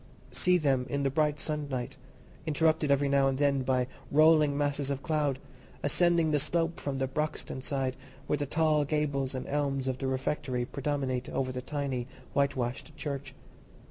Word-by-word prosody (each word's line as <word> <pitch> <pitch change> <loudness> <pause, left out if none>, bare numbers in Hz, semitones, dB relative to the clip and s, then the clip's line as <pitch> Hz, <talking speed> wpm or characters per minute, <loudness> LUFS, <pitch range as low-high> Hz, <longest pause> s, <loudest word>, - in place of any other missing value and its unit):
See 180 0 +3
them 135 -6 +1
in 140 -1 -1
the 135 - +1
bright 150 0 +1
sunlight, 140 -4 -3 0.5
interrupted 155 0 +2
every 140 0 +3
now 140 -1 +4
and 135 -1 0
then 140 -1 +2
by 130 -1 +1 0.3
rolling 155 -1 +5
masses 145 -1 0
of 140 -1 -3
cloud, 150 -5 +1 0.5
ascending 170 +1 +3
the 150 - +3
slope 165 +3 0
from 140 -2 -3
the 135 - +1
Broxton 150 -1 -3
side, 135 -2 -1 0.3
where 150 - 0
the 145 0 -2
tall 155 0 +3
gables 140 -3 -1
and 130 - -4
elms 140 -2 -1
of 130 -1 -1
the 135 - -1
rectory 130 -1 -1
predominate 135 -2 -2
over 130 -1 -1
the 125 0 -4
tiny 135 -3 -3 0.3
whitewashed 135 +1 -1
church. 140 -2 -5
140 Hz, 165 wpm, -30 LUFS, 130-150 Hz, 0.5 s, rolling